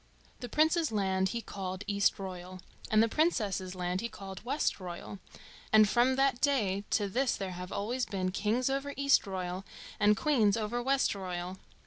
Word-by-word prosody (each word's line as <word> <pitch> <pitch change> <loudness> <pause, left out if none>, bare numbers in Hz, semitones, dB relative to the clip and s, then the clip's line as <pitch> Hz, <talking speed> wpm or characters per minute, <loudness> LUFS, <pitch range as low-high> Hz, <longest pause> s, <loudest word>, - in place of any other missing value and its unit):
The 245 - -6
Prince's 315 +3 +2
land 190 -2 +1
he 235 +4 -3
called 190 -2 -5
Eastroyal, 185 -3 -1 0.3
and 215 0 +5
the - - +3
Princess's 210 - 0
land 180 0 -2
he 235 - -3
called 195 -3 -9
Westroyal, 195 - -3 0.5
and 215 -1 +7
from 245 +4 +3
that 270 -2 +2
day 205 -9 +1
to 205 -2 +1
this 250 +6 +1
there 195 -1 -4
have 180 0 -7
always 245 +5 -2
been 185 -2 -2
kings 215 +6 0
over 275 +1 -2
Eastroyal 190 -9 +1 0.4
and 210 0 +4
queens 230 -9 +3
over 230 +2 -2
Westroyal. 190 -9 -1
205 Hz, 150 wpm, -31 LUFS, 190-250 Hz, 0.5 s, and